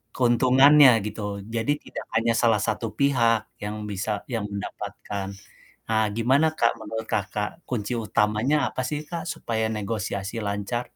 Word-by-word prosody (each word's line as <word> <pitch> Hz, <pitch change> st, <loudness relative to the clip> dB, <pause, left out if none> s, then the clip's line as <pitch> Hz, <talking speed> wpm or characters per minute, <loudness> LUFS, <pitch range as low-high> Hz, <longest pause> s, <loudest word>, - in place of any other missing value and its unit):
keuntungannya 130 Hz, 0 st, +6 dB
gitu. 105 Hz, -2 st, -5 dB
Jadi 115 Hz, +6 st, 0 dB
tidak -, -, -9 dB
hanya 115 Hz, +1 st, +3 dB
salah 115 Hz, -4 st, +3 dB
satu 115 Hz, -, -1 dB
pihak 115 Hz, -6 st, +2 dB
yang 105 Hz, +1 st, -4 dB
bisa 100 Hz, +1 st, -3 dB
yang 110 Hz, -3 st, -2 dB
mendapatkan. 100 Hz, 0 st, -5 dB, 0.6 s
Nah 110 Hz, -1 st, +2 dB
gimana 130 Hz, +8 st, +3 dB
Kak 115 Hz, -, +3 dB
menurut 110 Hz, +1 st, -5 dB
Kakak 105 Hz, -, -3 dB
kunci 120 Hz, -1 st, -2 dB
utamanya 110 Hz, +5 st, +1 dB
apa 130 Hz, -, -4 dB
sih 150 Hz, +4 st, -3 dB
Kak 170 Hz, -1 st, -5 dB
supaya 110 Hz, -6 st, -2 dB
negosiasi 105 Hz, 0 st, -3 dB
lancar? 100 Hz, +4 st, -2 dB
115 Hz, 135 wpm, -25 LUFS, 105-125 Hz, 0.6 s, keuntungannya